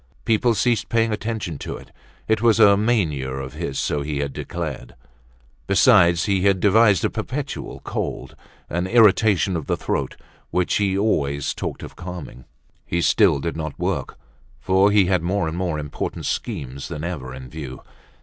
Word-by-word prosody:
People 115 +1 +2
ceased 115 0 +1
paying 115 -1 +2
attention 105 -8 -4
to - - -5
it, - - -15 0.4
it 110 -1 +1
was 115 -1 +4
a 100 -2 +7
mania 95 - 0
of 65 0 -5
his 75 -3 -4
so 75 - -1
he 75 0 -3
had 70 -1 -2
declared. 75 -8 -6 0.7
Besides, 95 -5 +5
he 100 -2 +1
had 100 -1 +3
devised 105 -1 +4
a - - +2
perpetual - - -5
cold, - - -4 0.3
an 85 +2 -2
irritation 105 -3 +4
of 80 -4 -4
the - - 0
throat, - - -2 0.3
which 90 -1 +1
he 100 -2 +1
always 70 -9 0
talked - - -5
of - - -9
calming. 85 -8 -8 0.4
He 85 - -2
still 90 -2 +4
did 85 +4 -3
not 80 -2 -5
work, - - -3 0.4
for 95 +2 +3
he 100 -2 +4
had 90 -1 +1
more 90 0 0
and 80 - -3
more 90 -3 -2
important 75 -1 -5
schemes 65 +1 -4
than 75 - -6
ever 75 -7 -5
in 65 0 -9
view. 65 -2 -8
90 Hz, 170 wpm, -22 LUFS, 75-105 Hz, 0.7 s, a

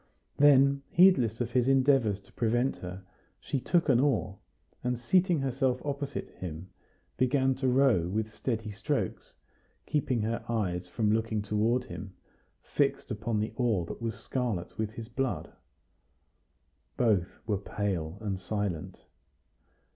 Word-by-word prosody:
Then, 140 -1 +6
heedless 130 - +4
of 120 0 -2
his 125 -1 +2
endeavors 135 -6 +3
to - - -23
prevent 120 +3 +1
her, 90 +1 -7 0.4
she 135 - -2
took 170 +6 +1
an 125 -4 +5
oar, 125 -8 +1 0.4
and, 125 -1 -1
seating 175 +5 +2
herself 130 -1 0
opposite 140 -1 -3
him, 90 0 -6 0.5
began 130 +1 +3
to 130 0 0
row 125 -9 +4
with 110 +3 -2
steady 110 -2 -3
strokes, 100 - -3 0.5
keeping 130 -6 0
her 115 +2 -2
eyes 90 -6 -1
from 105 +4 0
looking 110 -1 0
toward 110 +4 +1
him 100 -6 -8 0.5
fixed - - 0
upon 110 +1 -1
the 110 +1 -2
oar 110 -9 +1
that - - -8
was 115 -2 -2
scarlet 115 -9 -3
with 110 -1 -2
his 110 0 -8
blood. 130 +1 -3 1.4
Both 100 -7 +1
were 105 -3 0
pale 95 -4 -3
and 100 -3 -2
silent. 95 -4 -4
115 Hz, 135 wpm, -29 LUFS, 105-130 Hz, 1.4 s, Then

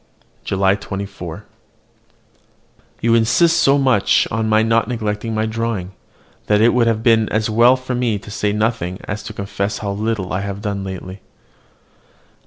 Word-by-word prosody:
JULY 95 0 +2
24. 95 -4 -7 1.6
You 115 0 +2
insist 115 +9 +3
so 140 +1 +4
much 130 -7 +3
on 110 0 -1
my 110 0 +4
not 115 -1 +2
neglecting 110 -1 -3
my 110 0 0
drawing, 110 -4 -3 0.6
that 105 0 +3
it 115 +2 +4
would 115 -2 +1
be 115 -2 +4
as 110 0 0
well 120 +3 +5
for 130 0 -5
me 120 -4 0
to 105 - -11
say 105 0 -1
nothing 105 -4 -1
as 105 0 -5
to - - -8
confess 100 0 -3
how 100 -1 -4
little 105 -2 -2
I 95 - -1
have 100 +1 -6
lately 95 -2 -4
done. - - -32
110 Hz, 155 wpm, -19 LUFS, 100-115 Hz, 1.6 s, well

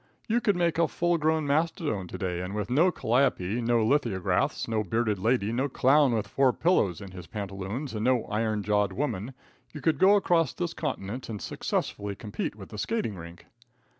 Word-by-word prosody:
You 235 +2 +2
could 205 -6 +2
take 170 -2 +1
a 165 - +4
full 170 +6 0
grown 155 0 +1
mastodon 150 - 0
to - - -7
day, 90 -2 -2
and 90 +3 -5
with 105 +3 -3
no 160 +8 +5
calliope, 120 - +1
no 115 -1 +2
lithographs, 115 -8 +1
no 110 -1 0
bearded 110 0 0
lady, 110 0 +1
no 130 +4 0
clown 135 +1 +4
with 105 -3 -1
four 130 +4 +2
pillows 105 - +1
in 100 -2 -9
his 90 -2 -10
pantaloons 100 +6 -5
and 110 -1 -3
no 125 -2 +3
iron 110 0 -1
jawed 105 -1 +1
woman, 125 -1 -3 0.4
you 150 - -8
could 160 +2 +1
go 195 +2 +6
across 170 -7 +2
this 175 -2 -3
continent 120 -5 -4
and 105 -2 -4
successfully 100 0 -3
compete 105 0 -4
with 100 -3 -11
the 105 - -8
skating 220 - -1
rink. 85 -1 -11
115 Hz, 190 wpm, -28 LUFS, 100-150 Hz, 0.4 s, go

